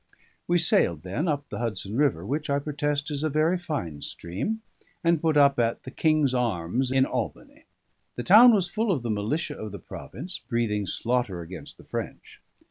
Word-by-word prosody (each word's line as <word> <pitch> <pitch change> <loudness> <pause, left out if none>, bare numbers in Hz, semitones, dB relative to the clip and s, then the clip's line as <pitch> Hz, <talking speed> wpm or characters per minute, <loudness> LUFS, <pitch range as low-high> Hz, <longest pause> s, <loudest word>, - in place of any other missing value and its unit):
We 175 - +3
sailed 85 - +2
then, 115 - -2
up 145 -2 -1
the - - -5
Hudson 110 -3 -3
River, 125 - +1
which, 145 +6 -2
I 140 - +2
protest, 145 0 -2
is 145 0 -2
a 155 - +1
very 155 +5 +2
fine 90 - -4
stream, 110 - -4 0.4
and 170 -2 +3
put 160 -2 +2
up 140 -2 +5
at 115 -1 0
the 130 - -8
"King's 155 -3 +2
Arms" 120 +1 0
in 130 0 +4
Albany. - - -5 0.5
The 120 - -4
town 225 - +9
was 195 -5 +2
full 215 +4 0
of 140 -10 -1
the 115 - -1
militia 110 +11 -1
of 110 -1 -6
the 100 - -6
province, 155 - -8
breathing 105 -4 -1
slaughter 115 -3 -1
against 85 0 -9
the - - -15
French. - - -6
135 Hz, 185 wpm, -26 LUFS, 105-155 Hz, 0.5 s, town